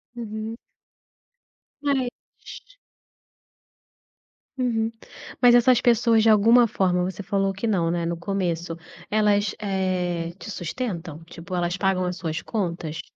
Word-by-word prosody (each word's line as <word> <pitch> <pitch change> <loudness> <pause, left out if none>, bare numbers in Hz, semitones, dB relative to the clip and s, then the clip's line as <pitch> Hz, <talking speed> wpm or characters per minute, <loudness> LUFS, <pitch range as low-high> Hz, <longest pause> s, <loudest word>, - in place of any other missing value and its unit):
Uhum. 220 -1 -5 1.3
Eh 265 -3 +1 2.5
Uhum, 230 -3 0 0.5
mas 245 -1 +7
essas 245 0 +5
pessoas, 235 -2 +4
de 225 - +4
alguma 230 +3 +6
forma, 180 -3 +1
você 190 +2 -5
falou 195 0 0
que 195 +5 -5
não, 180 -7 +1
né, 170 0 -1
no 170 0 -2
começo, 170 -2 -2 0.3
elas, 210 -1 +2
eh, 185 -4 -2
te 210 - -8
sustentam? 175 - -5
Tipo, 170 +2 -8
elas 175 +1 -1
pagam 195 -2 +1
as 180 0 -3
suas 165 -1 -3
contas? 170 -7 -3
195 Hz, 120 wpm, -24 LUFS, 175-225 Hz, 2.5 s, mas